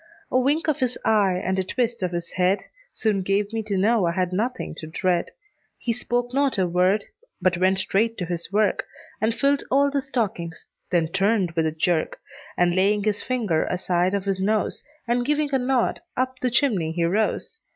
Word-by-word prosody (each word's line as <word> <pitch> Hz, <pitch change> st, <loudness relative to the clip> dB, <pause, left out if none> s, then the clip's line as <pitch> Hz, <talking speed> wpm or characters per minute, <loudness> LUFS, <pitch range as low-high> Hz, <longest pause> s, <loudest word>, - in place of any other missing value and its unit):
A 255 Hz, -, +4 dB
wink 290 Hz, +6 st, +1 dB
of 310 Hz, -, +1 dB
his 250 Hz, -1 st, 0 dB
eye, 200 Hz, -4 st, +3 dB
and 190 Hz, +1 st, 0 dB
a -, -, +1 dB
twist 235 Hz, +3 st, -1 dB
of 180 Hz, -1 st, -1 dB
his 170 Hz, -1 st, -4 dB
head, 185 Hz, +2 st, +2 dB, 0.3 s
Soon 210 Hz, -3 st, 0 dB
gave 200 Hz, +3 st, 0 dB
me 225 Hz, -, -1 dB
to 205 Hz, -2 st, -2 dB
know 205 Hz, -1 st, +3 dB
I 170 Hz, -, 0 dB
had 185 Hz, 0 st, -1 dB
nothing 240 Hz, +7 st, -2 dB
to 155 Hz, -, -6 dB
dread. 175 Hz, +1 st, 0 dB, 0.5 s
He 235 Hz, -, -1 dB
spoke 245 Hz, +1 st, -2 dB
not 275 Hz, -3 st, +2 dB
a 190 Hz, -, +2 dB
word, 185 Hz, +4 st, +2 dB, 0.3 s
but 175 Hz, -2 st, +1 dB
went 190 Hz, +1 st, +3 dB
straight 220 Hz, +4 st, +1 dB
to 180 Hz, -, -2 dB
his 170 Hz, +1 st, -4 dB
work, 205 Hz, -1 st, +1 dB, 0.3 s
And 220 Hz, +1 st, +1 dB
filled 280 Hz, +4 st, +2 dB
all 280 Hz, +1 st, +3 dB
the 280 Hz, 0 st, 0 dB
stockings; 200 Hz, -, -3 dB, 0.2 s
then 165 Hz, -3 st, +1 dB
turned 195 Hz, 0 st, +1 dB
with 165 Hz, -1 st, +1 dB
a -, -, 0 dB
jerk, 160 Hz, +1 st, 0 dB, 0.4 s
And 175 Hz, -1 st, +3 dB
laying 200 Hz, +2 st, +2 dB
his 210 Hz, -1 st, +1 dB
finger 220 Hz, -11 st, 0 dB
aside 180 Hz, +1 st, 0 dB
of 200 Hz, -1 st, -2 dB
his 195 Hz, -1 st, -1 dB
nose, 215 Hz, +2 st, 0 dB, 0.2 s
And 240 Hz, +1 st, +1 dB
giving 295 Hz, +1 st, 0 dB
a 265 Hz, -, +3 dB
nod, 250 Hz, -1 st, +1 dB, 0.2 s
up 255 Hz, 0 st, -1 dB
the 255 Hz, -, 0 dB
chimney 215 Hz, -, +1 dB
he 170 Hz, 0 st, 0 dB
rose. 215 Hz, -, 0 dB
200 Hz, 200 wpm, -24 LUFS, 180-245 Hz, 0.5 s, A